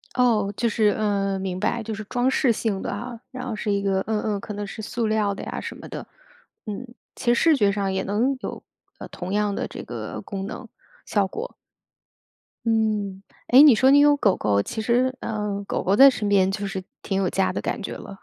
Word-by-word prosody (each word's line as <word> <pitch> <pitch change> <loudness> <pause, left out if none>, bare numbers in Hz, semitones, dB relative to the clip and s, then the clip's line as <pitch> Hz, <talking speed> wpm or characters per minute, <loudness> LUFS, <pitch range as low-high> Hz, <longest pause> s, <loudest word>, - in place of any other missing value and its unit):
哦， 225 -5 +2
就 235 - +1
是 215 -2 +2
嗯， 200 -2 0
明 185 -1 -3
白， 235 +4 -1
就 220 0 -4
是 215 +1 -6
装 245 +4 0
饰 260 -1 +2
性 215 -3 -1
的 - - -4
啊。 235 +3 -5
然 255 0 -6
后 225 - -3
是 210 0 -2
一 200 0 +1
个 195 -1 +1
嗯 220 -1 0
嗯， 210 -2 -1
可 210 - -7
能 205 0 -4
是 205 - -7
塑 230 +2 -2
料 215 -2 +1
的 - - -7
呀 - - -5
什 - - -6
么 - - -10
的。 - - -7 0.6
嗯， 215 +3 -5 0.3
其 240 - +1
实 - - +2
视 325 -2 +5
觉 205 -7 +3
上 195 -1 -1
也 190 - 0
能 235 +7 +1
有， - - -6 0.3
呃， - - -8
同 185 +2 -6
样 210 0 +1
的 - - -3
这 - - -8
个 - - -6
功 195 -2 -5
能、 - - -7 0.4
效 200 -2 +1
果。 - - -6 1.1
嗯， 215 -4 0 0.2
哎， 260 +3 +8
你 295 -5 +9
说 260 +5 +4
你 285 +1 +7
有 290 0 +5
狗 205 -9 +3
狗， 100 -1 +1
其 220 - -4
实， 250 +3 +1
呃， 210 -2 -3
狗 - - -2
狗 195 - +2
在 275 +5 +9
身 220 -5 -2
边 195 -2 +3
就 200 0 -3
是 195 -1 -4 0.2
挺 195 - -2
有 190 -2 +1
家 190 +1 0
的 - - -3
感 - - -3
觉 - - -5
了， 195 - -9
210 Hz, 245 characters per minute, -24 LUFS, 195-235 Hz, 1.1 s, 你